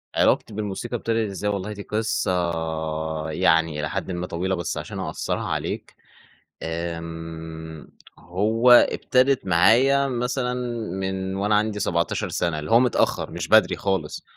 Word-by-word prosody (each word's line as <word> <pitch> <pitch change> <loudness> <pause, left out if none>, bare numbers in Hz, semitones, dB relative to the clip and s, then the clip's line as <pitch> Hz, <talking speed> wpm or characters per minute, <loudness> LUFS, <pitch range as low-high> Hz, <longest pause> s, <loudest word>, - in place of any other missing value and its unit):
علاقتي 105 - +2
بالموسيقى 110 +3 -4
ابتدِت 115 -2 -1
إزاي؟ 100 +1 -3
والله 100 +1 -3
دي 100 - -8
قصة 110 -3 -1 1.0
يعني 80 -2 +2
إلى 75 0 -2
حدٍ - - -3
ما 90 0 -3
طويلة 95 +3 -1
بس 85 -1 -3
عشان - - -6
أقصّرها - - -3
عليك، - - -4 0.7
آمم 80 -1 -6 0.3
هو 110 +8 +1
ابتدِت 130 +1 +4
معايا 120 +11 +4
مثلًا 125 0 -1 0.5
من 95 0 -3
وأنا 105 +2 +1
عندي 105 0 +1
17 85 -3 0
سَنة، 80 -3 -1
اللي 75 0 -6
هو 115 - +6
متأخر 125 -1 +1
مش - - -5
بدري - - +5
خالص. 95 -6 -2
95 Hz, 135 wpm, -24 LUFS, 85-115 Hz, 1.0 s, هو